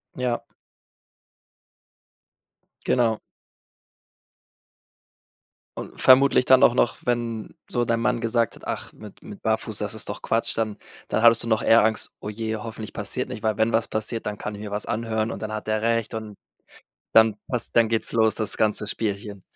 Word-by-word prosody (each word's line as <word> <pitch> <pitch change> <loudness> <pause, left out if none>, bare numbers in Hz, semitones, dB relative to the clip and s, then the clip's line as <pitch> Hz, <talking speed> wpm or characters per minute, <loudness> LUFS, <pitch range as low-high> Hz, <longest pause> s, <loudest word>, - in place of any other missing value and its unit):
Ja. 125 -2 -1 2.4
Genau. 115 -3 +2 2.6
Und - - -7
vermutlich 130 0 +6
dann 130 0 +6
auch - - +7
noch, 120 - +1
wenn 120 -2 -2 0.2
so 120 -1 0
dein 115 0 +1
Mann 115 - +1
gesagt 115 0 0
hat: - - -17
„Ach, - - -5
mit - - -13
mit - - -11
Barfuß, - - -1
das - - -3
ist - - -6
doch - - -6
Quatsch“, 115 0 0
dann 110 -2 -1 0.3
dann - - 0
hattest 115 0 +6
du - - -5
noch 110 -1 +2
eher 115 0 +5
Angst: 110 0 0
„Oh 105 - -6
je, 110 +1 -3
hoffentlich 110 0 -7
passiert 115 +5 -3
nicht.” 115 -4 -7
Weil 110 -1 0
wenn 110 +1 +2
was 115 - +2
passiert, 110 +1 -3
dann 105 -1 -4
kann 105 - -5
ich 100 - -9
mir 105 -1 -6
was 105 +1 -4
anhören 110 0 -1
und - - -5
dann 110 0 -5
hat 110 0 -5
er 110 0 0
recht 115 -1 0
und 110 -2 -6 0.8
dann 110 -1 +6
passt 125 -2 -3
dann 115 -1 +5
geht's 115 0 0
los, 110 -2 +3
das 110 -2 -2
ganze 105 -1 +1
Spielchen. 100 -2 -3
110 Hz, 175 wpm, -24 LUFS, 110-115 Hz, 2.6 s, auch